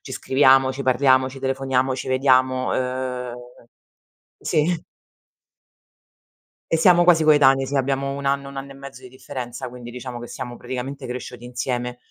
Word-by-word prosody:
ci - - -10
scriviamo, 135 -1 +4
ci 135 +1 -5
parliamo, 130 0 +3
ci 135 - -10
telefoniamo, 135 -1 0
ci 130 - -6
vediamo, 130 -1 +2
uhm, 125 -1 -3 1.1
sì. 160 +2 0 1.9
E 165 - +2
siamo 175 +1 +5
quasi 170 -2 +5
coetanei, 135 -3 +5
sì. 140 - -3
Abbiamo 135 +1 0
1 140 0 -6
anno, 140 0 0
1 140 - -11
anno 135 0 -6
e - - -11
mezzo 135 -1 -11
di 130 - -11
differenza, 125 -1 -7
quindi 120 -1 -10
diciamo 125 0 -7
che 120 - -8
siamo 120 0 -7
praticamente 130 +3 -6
cresciuti 125 -1 -7
insieme. 125 0 -3
130 Hz, 155 wpm, -22 LUFS, 125-140 Hz, 1.9 s, siamo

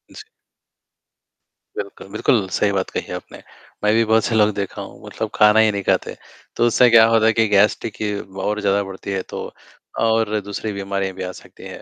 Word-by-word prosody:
जी। - - -9 1.5
बिल्कुल, 100 - -7
बिल्कुल, 110 -1 +1
सही 100 +2 +1
बात 95 -1 -2
कही - - -5
आपने। - - -8 0.5
मैं 105 +1 +3
भी 115 0 +4
बहुत 110 0 +3
से 115 - -1
लोग 105 -1 +4
देखा 100 -2 -4
हूँ, - - -11
मतलब - - -5
खाना 105 0 +5
ही 110 -1 +4
नहीं 100 -1 -4
खाते। - - 0 0.4
तो 120 - +2
उससे 120 +1 +4
क्या 115 -1 +7
होता 115 -1 +3
है 115 - +4
कि 115 0 +2
गैस, 105 0 +3
देखिए 105 -1 -4
वो 95 0 -9
और 105 0 -1
ज़्यादा 100 0 +2
बढ़ती 95 0 -8
है, 95 -1 -1
तो - - -7 0.5
और 110 -1 +1
दूसरी 100 +2 -5
बीमारियाँ 100 -1 -3
भी 95 - -5
आ 90 - -4
सकती - - -15
हैं। - - -10
105 Hz, 205 wpm, -20 LUFS, 100-110 Hz, 1.5 s, क्या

